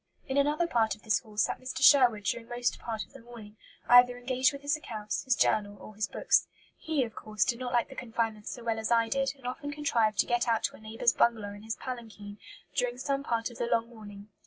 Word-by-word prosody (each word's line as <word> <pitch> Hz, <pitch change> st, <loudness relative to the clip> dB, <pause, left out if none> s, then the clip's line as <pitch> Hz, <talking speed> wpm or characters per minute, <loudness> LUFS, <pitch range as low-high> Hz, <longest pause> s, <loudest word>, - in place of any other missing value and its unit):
"In 265 Hz, -, -3 dB
another 295 Hz, +4 st, +2 dB
part 225 Hz, -, +1 dB
of 215 Hz, -, -23 dB
this 220 Hz, -, +2 dB
hall 215 Hz, -3 st, -17 dB
sat -, -, +1 dB
Mr. 255 Hz, +1 st, -4 dB
Sherwood 245 Hz, -7 st, +6 dB
during 230 Hz, +3 st, -2 dB
most 245 Hz, 0 st, -1 dB
part 220 Hz, -2 st, -4 dB
of -, -, -27 dB
the -, -, -12 dB
morning, 230 Hz, -3 st, -12 dB, 0.3 s
either 245 Hz, 0 st, +7 dB
engaged 255 Hz, +1 st, +1 dB
with 280 Hz, 0 st, -9 dB
his 290 Hz, +1 st, +1 dB
accounts, 215 Hz, -8 st, -5 dB
his 260 Hz, -2 st, +3 dB
journal, 205 Hz, -1 st, +1 dB
or 215 Hz, -, -11 dB
his 210 Hz, 0 st, -2 dB
books. -, -, +2 dB, 0.3 s
He, 315 Hz, -4 st, -1 dB
of 225 Hz, -2 st, -6 dB
course, 215 Hz, -1 st, -1 dB
did 235 Hz, -1 st, -1 dB
not 255 Hz, -1 st, -4 dB
like 240 Hz, -1 st, +2 dB
the -, -, -9 dB
confinement 225 Hz, -4 st, -3 dB
so 240 Hz, -, -6 dB
well 225 Hz, -1 st, -1 dB
as 220 Hz, -, -2 dB
I 230 Hz, -1 st, +3 dB
did, 270 Hz, +2 st, 0 dB
and 265 Hz, -, -18 dB
often 265 Hz, +4 st, -4 dB
contrived 235 Hz, -8 st, +1 dB
to -, -, +4 dB
get 240 Hz, 0 st, 0 dB
out 230 Hz, -1 st, +1 dB
to -, -, -1 dB
a -, -, -15 dB
neighbour's 225 Hz, +2 st, +1 dB
bungalow 220 Hz, -4 st, +1 dB
in 205 Hz, -, -11 dB
his 220 Hz, +1 st, -4 dB
palanquin 220 Hz, -5 st, -8 dB, 0.3 s
during 245 Hz, -1 st, -1 dB
some 275 Hz, +1 st, -1 dB
part 230 Hz, -3 st, -2 dB
of 240 Hz, -, -13 dB
the 235 Hz, -, -1 dB
long 230 Hz, 0 st, +1 dB
morning. 205 Hz, -3 st, -12 dB
235 Hz, 240 wpm, -29 LUFS, 220-255 Hz, 0.3 s, either